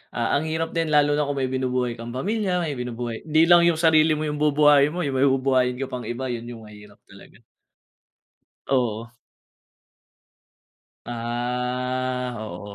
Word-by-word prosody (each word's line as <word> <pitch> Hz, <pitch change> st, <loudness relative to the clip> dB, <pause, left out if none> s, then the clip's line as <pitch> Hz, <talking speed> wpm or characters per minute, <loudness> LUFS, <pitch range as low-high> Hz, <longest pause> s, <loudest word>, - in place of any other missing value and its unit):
ah, 120 Hz, -1 st, -1 dB
ang 155 Hz, -, -3 dB
hirap 160 Hz, +1 st, -2 dB
din 165 Hz, -1 st, 0 dB
lalo 145 Hz, 0 st, +3 dB
na 150 Hz, -, +1 dB
kung 145 Hz, -, -2 dB
may 130 Hz, -, -1 dB
binubuhay 125 Hz, -2 st, -1 dB
kang 115 Hz, +1 st, -7 dB
pamilya, 190 Hz, +2 st, -1 dB
may 150 Hz, -5 st, -3 dB
binubuhay 120 Hz, -1 st, -5 dB
hindi 155 Hz, +1 st, +4 dB
lang 175 Hz, -1 st, +7 dB
yung 170 Hz, -, +3 dB
sarili 160 Hz, -1 st, +4 dB
mo 155 Hz, -, -3 dB
yung 150 Hz, 0 st, -4 dB
bubuhayin 150 Hz, 0 st, +4 dB
mo, 180 Hz, -, -2 dB
yung 135 Hz, -2 st, -2 dB
may 140 Hz, -, +4 dB
bubuhayin 130 Hz, -2 st, +1 dB
ko 135 Hz, -, -3 dB
pang 125 Hz, -1 st, -5 dB
iba, 125 Hz, +2 st, -4 dB
yun 120 Hz, 0 st, -5 dB
yung 115 Hz, -2 st, -9 dB
mahirap 105 Hz, -1 st, -15 dB
talaga. -, -, -17 dB, 1.3 s
Oo. 115 Hz, -3 st, -1 dB, 2.0 s
Ah, 125 Hz, +1 st, -3 dB
oo, 105 Hz, -1 st, -8 dB
130 Hz, 160 wpm, -23 LUFS, 120-150 Hz, 2.0 s, lang